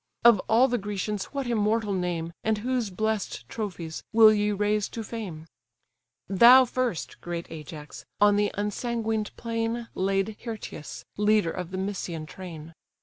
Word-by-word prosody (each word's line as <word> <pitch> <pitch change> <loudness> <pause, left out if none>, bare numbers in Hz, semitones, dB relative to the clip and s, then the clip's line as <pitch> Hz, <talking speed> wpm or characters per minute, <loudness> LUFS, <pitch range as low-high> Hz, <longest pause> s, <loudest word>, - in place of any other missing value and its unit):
Of 235 -4 +8
all 235 +4 +6
the 245 -1 0
Grecians 205 0 -3
what 275 -2 -4
immortal 220 -2 +1
name, 175 -3 -2
And 220 0 +1
whose 245 0 -1
bless'd 205 - -2
trophies, 175 - -5
will 220 -1 +8
ye 210 0 +1
raise 210 0 0
to 225 - -5
fame? 195 -9 -6 0.8
Thou 240 +7 +8
first, 245 -6 -3
great 170 -1 -4
Ajax! 150 -1 -9 0.2
on 205 0 +5
the 205 0 +2
unsanguined 220 +1 -1
plain 230 0 -2
Laid 195 +2 0
Hyrtius, 220 -9 -7
leader 210 -4 +3
of 180 -2 -5
the 185 - -5
Mysian 185 -5 -3
train. 165 -2 -9
210 Hz, 145 wpm, -27 LUFS, 180-225 Hz, 0.8 s, Of